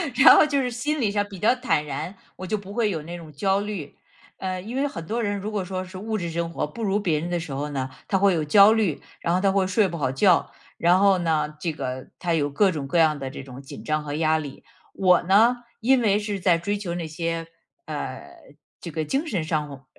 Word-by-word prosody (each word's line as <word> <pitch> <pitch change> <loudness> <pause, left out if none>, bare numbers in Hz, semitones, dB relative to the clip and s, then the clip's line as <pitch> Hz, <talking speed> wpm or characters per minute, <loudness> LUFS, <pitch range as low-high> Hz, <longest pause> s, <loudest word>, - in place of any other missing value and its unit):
然 265 - +9
后 - - +7
就 285 -2 +1
是 250 - -1
心 280 +5 -2
理 205 -3 +1
上 205 0 0
比 200 -3 -10
较 230 +5 +3
坦 245 -12 0
然， 150 +7 -5 0.2
我 185 - -7
就 215 - 0
不 200 0 -10
会 225 -2 +1
有 160 -5 -3
那 175 +2 -7
种 160 -3 -11
焦 195 +6 +1
虑。 200 -9 -5 0.4
嗯， 185 0 -4
因 245 +4 -5
为 285 +1 +1
很 165 -11 -7
多 230 +5 -2
人 205 -1 -1
如 210 +2 -5
果 200 -3 -2
说 185 0 -4
是 185 0 -10
物 215 +2 -3
质 170 -3 -3
生 170 0 -2
活 - - -1
不 190 +10 -9
如 200 0 +1
别 165 -7 0
人 170 +2 -4
的 175 - -1
时 165 -3 -7
候 145 +2 -3
呢， 130 -2 -3 0.2
他 195 - +2
会 195 -1 +4
有 160 -2 0
焦 200 +7 +7
虑， 210 -9 +1 0.2
然 170 - 0
后 185 - +1
他 195 -1 +3
会 190 -1 +2
睡 195 +1 +3
不 170 -1 -5
好 130 -3 0
觉， 175 +5 +3 0.3
然 175 +2 +4
后 195 -1 +5
呢， 160 -3 0
这 165 -3 -2
个 130 -3 -5
他 175 -2 -1
有 145 -3 +1
各 190 +7 +3
种 145 -4 -4
各 170 - 0
样 155 -3 +3
的 135 -1 -4
这 135 - -8
种 130 0 -10
紧 135 - -10
张 155 0 -1
和 145 -1 -5
压 160 0 +2
力。 145 -3 -7 0.3
我 180 -2 +4
呢？ 230 +6 +4 0.2
因 255 +2 +4
为 205 -2 +3
是 205 -3 -4
在 175 -3 +4
追 205 +4 -2
求 180 -4 -4
那 170 -2 -4
些， 165 +1 -3 0.4
呃， - - -6 0.4
这 170 - -7
个 155 0 -2
精 275 - -1
神 175 - -2
上 150 -4 -3
180 Hz, 270 characters per minute, -24 LUFS, 155-205 Hz, 0.4 s, 然